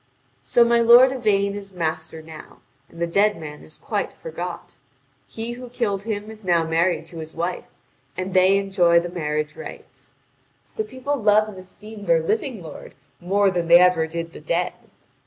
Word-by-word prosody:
So 240 - +4
my 235 0 +3
lord 240 +3 +7
Yvain 205 -6 +1
is 200 -1 -8
master 160 -2 -4
now, 155 -1 -13 0.3
and 170 - -14
the 170 - +1
dead 205 +5 +2
man 150 -1 -9
is 155 - -14
quite - - -3
forgot. 485 -1 -7 0.5
He 230 +1 -5
who 245 +1 -8
killed 215 -5 -1
him 210 0 -4
is 220 -1 -12
now 175 -3 +2
married 165 +1 0
to 165 0 -9
his 160 0 -8
wife, 175 +2 -3 0.5
and 185 0 -4
they 190 +1 +5
enjoy 185 -4 +3
the 175 +1 -5
marriage 150 -3 -3
rights. - - -11 0.6
The 435 - -1
people 285 -7 -3
love 215 -2 +3
and 200 - -10
esteem 210 +3 -12
their - - +3
living 335 - -2
lord 155 -3 -11 0.2
more 195 +2 +2
than 175 -2 -2
they 170 +1 +9
ever 180 -3 +4
did 165 +1 -5
the - - -11
dead. 170 +3 -1
190 Hz, 175 wpm, -22 LUFS, 170-220 Hz, 0.6 s, they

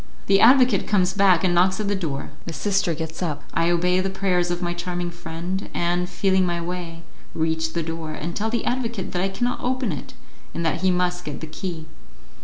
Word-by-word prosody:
The 195 0 +4
advocate 255 +1 +6
comes 190 -3 +2
back 195 -2 +4
and 180 -2 +3
knocks 185 +3 +3
at 210 - -1
the 205 - +1
door; 155 -8 -3 0.2
the 165 - -4
sister 195 +1 +1
gets 160 +1 -5
up, 150 -5 -2
I 165 0 +2
obey 180 +1 +2
the 190 +1 0
prayers 185 -2 +1
of 175 0 -1
my 175 -1 -1
charming 175 0 -3
friend, 175 +2 -5
and, 175 +1 0
feeling 190 +1 +2
my 175 -1 0
way, 170 -1 -5 0.3
reach 160 0 0
the 170 - -1
door, 165 -1 -4
and 165 +2 -5
tell 220 +2 -1
the 235 +1 -1
advocate 235 -5 -2
that 180 - -1
I 195 - +1
cannot 245 +6 -1
open 255 -3 0
it, 145 - -7 0.4
and 170 - -2
that 160 - 0
he 190 - +3
must 180 0 0
get 150 -4 -5
the - - -5
key. 160 0 -5
180 Hz, 210 wpm, -23 LUFS, 165-195 Hz, 0.4 s, advocate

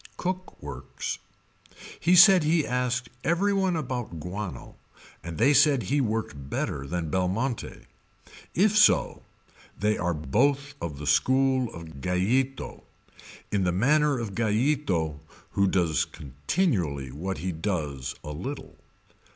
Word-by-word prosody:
Cook 185 0 -4
works. - - -5 0.8
He 175 +3 +4
said 180 -1 +8
he 155 0 +2
asked 125 -1 -1
every 195 +5 +2
one 190 -2 +1
about 125 - -4
Guano 90 +3 -6 0.5
and 85 -2 -6
they 140 +7 +4
said 140 -2 +5
he 145 +1 +1
worked 105 - -3
better 70 -1 -3
than 85 0 -3
Belmonte. 100 - -2 0.7
If 205 +4 +3
so 210 -1 +4 0.6
they 105 +2 +1
are 90 -1 0
both 140 - +1
of 75 -4 -4
the 75 - -7
school 130 - +2
of 80 -6 -10
Gallito, 115 - -1 0.7
in 100 -2 +1
the 90 - +2
manner 145 - +3
of 115 -5 -4
Gallito 110 - 0 0.3
who 100 0 +2
does 85 -5 +1
continually 75 - -2
what 90 +7 -4
he 90 +5 -3
does 80 -7 -3
a 75 - -6
little. 130 - -7
110 Hz, 125 wpm, -27 LUFS, -, 0.8 s, said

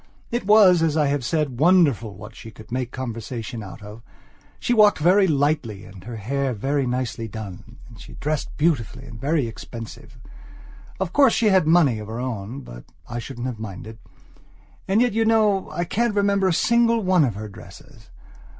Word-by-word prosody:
It 240 -4 -2
was, 200 -5 +6
as 160 -1 +1
I 150 - +3
have 140 -2 -1
said, 145 -3 -1
wonderful 145 - +3
what - - -11
she 115 - -10
could 110 0 -15
make 125 0 -2
conversation 120 -1 -6
out 100 +1 -10
of. 105 +2 -10 0.6
She 245 - 0
walked 210 -3 +5
very 185 +5 +4
lightly, 145 - 0
and 95 -2 -13
her 120 - -6
hair 135 +5 -2
was 105 - -10
very 140 +2 0
nicely 120 -2 -3
done, 110 +1 -9
and 115 -3 -14
she - - -12
dressed 150 0 -3
beautifully 150 -8 0
and 110 -1 -11
very 150 -1 +1
expensively. 115 +1 -9 0.8
Of 185 -2 -3
course 275 -5 +5
she 220 - +3
had 190 -5 +3
money 155 -9 +4
of 105 - -8
her 115 +2 -5
own, 125 0 -5
but - - -11 0.2
I 120 - -5
shouldn't 120 0 -7
have 125 -4 -4
minded. 110 +1 -8 0.9
And 200 +4 +3
yet 245 -4 0
you 225 +1 +2
know 215 -3 +2
I 175 - -2
can't 225 +5 -1
remember 200 -1 +2
a - - +2
single 230 +5 +2
one 185 -3 +4
of 120 -7 0
her 105 +1 -6
dresses. 100 - -14
135 Hz, 185 wpm, -23 LUFS, 115-185 Hz, 0.9 s, was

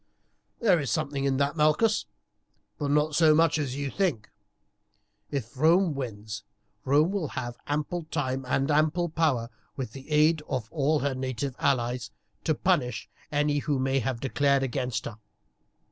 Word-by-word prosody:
"There 195 -8 +4
is 140 -4 -2
something 140 0 -1
in 135 -1 +1
that, 140 +2 +1
Malchus, 155 +9 +2 0.7
but 145 -2 -1
not 150 +1 +2
so 155 0 +5
much 160 -1 +3
as 135 -3 -2
you 140 -1 -3
think. 165 - -1 1.0
If 135 -4 -4
Rome 165 +4 +4
wins, 110 -5 -6 0.4
Rome 150 +6 +3
will 195 -6 -1
have 120 -3 -5
ample 150 +3 -2
time 135 -4 -2
and 135 +3 +1
ample 155 +4 +2
power, 145 -8 0 0.2
with 130 -5 -4
the 135 +4 -11
aid 155 +1 +4
of 130 -5 -2
all 155 0 +2
her 140 -1 0
native 130 0 -3
allies, 120 -2 0 0.4
to 155 - +2
punish 125 -10 0 0.2
any 145 0 +1
who 145 0 -1
may 135 +1 +1
have 125 -1 -2
declared 140 +1 +2
against 125 -3 -2
her. 110 -1 -7
140 Hz, 155 wpm, -27 LUFS, 130-155 Hz, 1.0 s, so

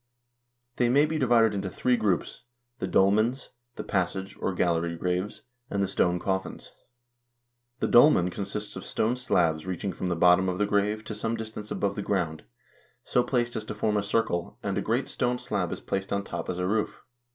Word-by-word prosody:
They 120 -1 +3
may 140 +4 +5
be 155 0 -2
divided 115 -4 +4
into 100 -1 -2
three 125 +7 +1
groups: 100 -7 -1 0.4
the - - -2
dolmens, 110 +7 +2 0.2
the - - -5
passage 95 0 -2
or - - 0
gallery 85 -2 0
graves, 90 +6 -2 0.3
and 100 -1 0
the - - 0
stone 90 -1 +1
coffins. 95 +1 -3 1.1
The - - +2
dolmen 120 - +6
consists 100 +2 -4
of - - -6
stone 115 +3 0
slabs 85 -10 +1
reaching 95 +1 -3
from 90 - -4
the 90 - 0
bottom 90 +2 +5
of 90 - -2
the 105 - +2
grave 105 +1 0
to 110 - -6
some 110 +2 -2
distance 110 -1 -7
above 100 -1 -1
the 105 - -3
ground, 85 -6 -1 0.6
so 125 - +2
placed 120 -1 0
as 110 -1 -3
to 105 - -6
form 105 0 0
a 105 - +2
circle, 100 -4 -1
and - - -1
a - - 0
great - - 0
stone 125 0 -1
slab 100 -7 -2
is - - -5
placed 95 0 -3
on 100 0 0
top - - -5
as 90 - -2
a 90 - -1
roof. 105 +3 -1
100 Hz, 195 wpm, -27 LUFS, 90-110 Hz, 1.1 s, dolmen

